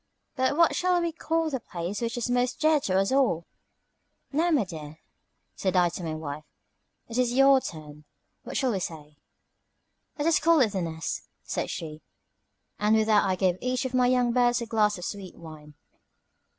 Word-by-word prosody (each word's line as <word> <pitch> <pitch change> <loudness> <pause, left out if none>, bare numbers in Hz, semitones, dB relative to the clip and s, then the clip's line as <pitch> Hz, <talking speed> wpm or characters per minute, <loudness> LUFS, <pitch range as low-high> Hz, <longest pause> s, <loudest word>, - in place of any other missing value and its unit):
"But 260 +2 +1
what 335 -1 +4
shall 360 0 +2
we 340 -1 -1
call 325 0 -1
the 265 - -2
place 180 0 -5
which 235 +1 -2
is 240 - -1
most 245 0 0
dear 310 -1 +4
to 190 -9 0
us 195 +3 +1
all?" 250 -12 +2 0.9
"Now, 320 +5 +1
my 295 -9 +3
dear," 155 -4 -9 0.6
said 190 -1 -1
I 175 -1 +4
to 175 - -7
my 160 -1 -3
wife, 155 -1 -6 0.6
"it 235 +2 -3
is 245 -1 +2
your 270 +1 +6
turn. 150 -4 -9 0.4
What - - -5
shall 260 -3 +1
we 195 - -1
say?" 150 -4 -7 1.0
"Let 295 - -2
us 330 - +4
call 330 0 +4
it 235 - +4
The 190 -2 -2
Nest," 160 -1 -4 0.2
said - - -3
she; 155 -1 -6 0.8
and 210 +1 +3
with 220 0 +3
that 215 -2 +4
I 190 -1 +1
gave 185 -1 +1
each 255 +1 -1
of 260 - -4
my 250 -1 +3
young 245 -1 +2
birds 245 0 +3
a 235 - -4
glass 215 -3 +1
of 180 - -6
sweet 195 -3 -6
wine. 155 -2 -12
220 Hz, 190 wpm, -27 LUFS, 170-260 Hz, 1.0 s, your